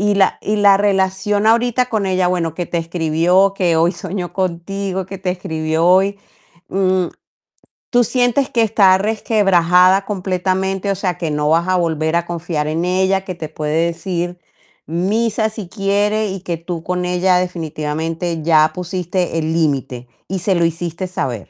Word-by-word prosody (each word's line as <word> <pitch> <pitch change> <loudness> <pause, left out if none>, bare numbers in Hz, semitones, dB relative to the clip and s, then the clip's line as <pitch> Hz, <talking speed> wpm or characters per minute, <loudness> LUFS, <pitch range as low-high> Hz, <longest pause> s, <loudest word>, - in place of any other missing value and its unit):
Y 205 0 +2
la 195 -1 +2
y 210 - -1
la 205 -2 +5
relación 200 +1 +1
ahorita 240 +2 +2
con 215 -5 -1
ella, 185 -1 +1
bueno, 170 -3 -1
que 175 0 -4
te 170 - -2
escribió, 165 +3 +2
que 180 -4 +1
hoy 165 +2 +3
soñó 180 -1 -5
contigo, 190 +1 -3
que 195 0 -8
te 185 -1 -2
escribió 160 -2 -2
hoy, 195 +3 +3 0.5
mm, 185 -2 +1 0.8
¿tú 245 0 +3
sientes 245 +3 +1
que 235 - +2
está 200 -4 +4
resquebrajada 195 -3 +3
completamente? 190 0 -1
O 195 - -1
sea, 180 -2 -2
que 165 -4 -3
no 150 0 0
vas 165 +3 +2
a 185 - +2
volver 160 -1 0
a 170 0 0
confiar 165 -3 -3
en 165 +3 -1
ella, 190 +1 +1
que 185 - -4
te 160 -3 -7
puede 155 +2 -1
decir 175 +1 -3 0.5
misa 215 +6 0
si 215 -4 -8
quiere 205 +2 0
y 190 -1 -5
que 175 -3 -3
tú 165 0 -6
con 180 +1 -2
ella 180 +1 +2
definitivamente 165 -1 -3
ya 155 -1 +4
pusiste 180 -1 -2
el 160 0 -2
límite 135 -6 -1 0.2
y 190 - -3
se 190 +3 +1
lo 170 -2 +2
hiciste 170 +2 -3
saber. 130 - -4
180 Hz, 170 wpm, -18 LUFS, 165-195 Hz, 0.8 s, la